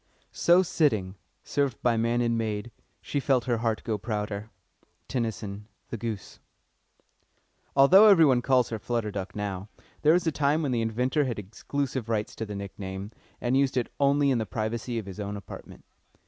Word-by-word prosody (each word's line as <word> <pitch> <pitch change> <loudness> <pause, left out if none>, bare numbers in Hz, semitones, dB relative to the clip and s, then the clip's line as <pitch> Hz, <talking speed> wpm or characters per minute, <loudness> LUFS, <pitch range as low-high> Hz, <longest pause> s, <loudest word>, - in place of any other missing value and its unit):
"So 175 +2 +5
sitting, 110 - +1 0.3
served 140 -5 -1
by 120 -1 +3
man 115 +2 +1
and 115 -1 +1
maid, 110 0 -2 0.3
She 145 - -2
felt 130 -3 +2
her 120 -2 +1
heart 115 -1 -1
grow 110 -3 -2
prouder." 105 0 -4 0.6
TENNYSON: 105 -4 -3 0.2
The 115 - -3
Goose. 110 -2 -6 1.4
Although 180 +10 +8
everybody 160 -11 +6
calls 125 -1 +3
her 110 - -4
"Flutter 115 -1 -2
Duck" 95 -2 -5
now, 100 -1 -4 0.3
there 155 +1 +5
was 175 0 +2
a 160 - +2
time 150 +2 +1
when 140 - 0
the 120 -2 +1
inventor 125 +6 +1
had 120 -4 -3
exclusive 120 +4 -4
rights 110 -1 -1
in 110 - -5
the 105 - -6
nickname, 100 0 -6 0.3
and 125 +1 0
used 135 -1 +2
it 120 - -1
only 140 0 +3
in 125 - +2
the 110 - -3
privacy 115 +2 -3
of 110 - -3
his 100 +1 -9
own 100 0 -4
apartment. 100 - -11
115 Hz, 175 wpm, -27 LUFS, 105-135 Hz, 1.4 s, Although